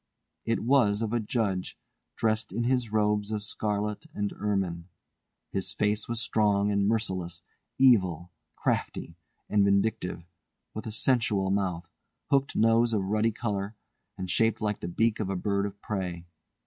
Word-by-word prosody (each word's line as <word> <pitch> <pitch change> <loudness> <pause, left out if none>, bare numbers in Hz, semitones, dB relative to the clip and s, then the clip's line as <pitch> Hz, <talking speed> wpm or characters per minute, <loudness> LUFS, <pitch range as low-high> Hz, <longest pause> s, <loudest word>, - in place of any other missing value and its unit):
It 115 - +1
was 115 -4 +3
of 110 0 -2
a 120 - +2
judge 105 -4 -1 0.4
dressed 110 0 0
in 120 - -1
his 125 -2 +1
robes 105 -1 +1
of 105 -1 -2
scarlet 105 +5 -2
and 105 -1 -2
ermine. 95 -5 -2 0.6
His 95 -1 0
face 105 +2 0
was 120 -1 -1
strong 105 -3 +2
and 100 -1 +2
merciless, 95 -6 -1 0.3
evil, 90 - +4 0.2
crafty, 85 - -2 0.3
and 105 -1 +3
vindictive, 100 -3 +1 0.5
with 110 - -6
a - - -4
sensual 110 -4 +2
mouth, 90 -4 -1 0.4
hooked 140 0 +2
nose 115 +1 +4
of 105 -3 +1
ruddy 110 +2 +2
colour, 105 -2 -3 0.4
and 95 - -4
shaped 115 +4 +2
like 105 -1 -1
the - - -5
beak 110 +5 +1
of 105 -3 -2
a 95 - -1
bird 100 +2 0
of 100 0 -10
prey. 90 -5 -3
105 Hz, 150 wpm, -28 LUFS, 95-110 Hz, 0.6 s, evil